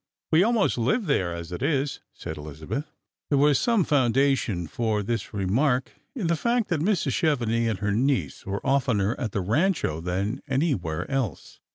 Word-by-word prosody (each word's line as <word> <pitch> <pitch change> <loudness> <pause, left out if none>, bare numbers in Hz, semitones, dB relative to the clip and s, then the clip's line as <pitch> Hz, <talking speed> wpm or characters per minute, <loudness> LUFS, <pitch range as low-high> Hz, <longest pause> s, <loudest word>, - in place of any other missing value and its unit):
We 160 +1 +6
almost 220 - +2
live 205 - +1
there, 90 - +1
as 85 0 -6
it 90 - -5
is," 140 -2 0
said - - -7
Elizabeth. 75 - -6 0.4
There 145 - +3
was 145 -1 +4
some 230 -5 +3
foundation 135 - +2
for 105 +4 -1
this 115 0 -3
remark 125 +7 +1 0.2
in 230 -9 -3
the 170 0 +2
fact 235 +5 0
that 170 - +1
Mrs. 170 -4 +1
Chevenix 115 -8 +1
and 110 - -1
her 105 0 0
niece 130 +5 0
were 100 +1 -4
oftener 125 -7 +2
at 115 - -2
the 100 - -1
Rancho 115 - +1
than 95 +8 -2
anywhere 130 - 0
else. 130 - -3
125 Hz, 170 wpm, -26 LUFS, 100-150 Hz, 0.4 s, We